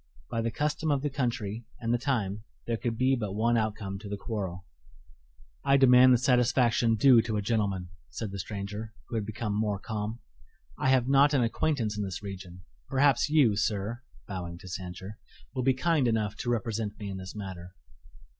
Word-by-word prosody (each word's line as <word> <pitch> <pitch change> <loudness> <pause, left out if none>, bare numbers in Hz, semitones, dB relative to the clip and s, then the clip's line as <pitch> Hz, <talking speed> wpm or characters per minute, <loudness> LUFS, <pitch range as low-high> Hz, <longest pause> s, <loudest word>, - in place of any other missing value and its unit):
By 115 - 0
the 115 - 0
custom 150 +5 -1
of 140 -2 +1
the 145 - -1
country 120 -5 -2 0.2
and 115 0 0
the 120 - +2
time 110 -6 -1 0.2
there 115 - -1
could 115 0 -3
be 130 +2 +3
but 105 -6 -3
one 115 +2 +2
outcome 105 -3 -2
to 105 0 -9
the 100 - -3
quarrel. 95 -5 -4 1.0
"I 140 0 +5
demand 130 -1 +7
the 125 - +6
satisfaction 125 -2 +3
due 120 +1 +6
to 110 -1 -2
a - - 0
gentleman," 100 -5 -1 0.2
said 110 -4 -5
the 100 - -5
stranger, 105 +3 -5
who 120 - -4
had 105 -2 -2
become 110 -1 -3
more 105 -1 0
calm. 105 +2 -4 0.6
"I 130 - 0
have 130 -2 +3
not 140 +2 +5
an 130 - +3
acquaintance 115 -3 0
in - - 0
this 95 0 -5
region. 90 -2 -8 0.2
Perhaps 140 +2 +3
you, 140 -9 +4
sir," 105 +3 -1 0.3
bowing 90 -3 -5
to 95 - -12
Sancher, 95 +2 -7 0.3
"will - - -1
be 130 +1 +3
kind 155 -2 +2
enough 110 -2 0
to 120 - -3
represent 110 -3 -2
me 105 - -6
in 95 -1 -4
this 95 +1 -8
matter." 95 -3 -7
110 Hz, 190 wpm, -29 LUFS, 100-125 Hz, 1.0 s, demand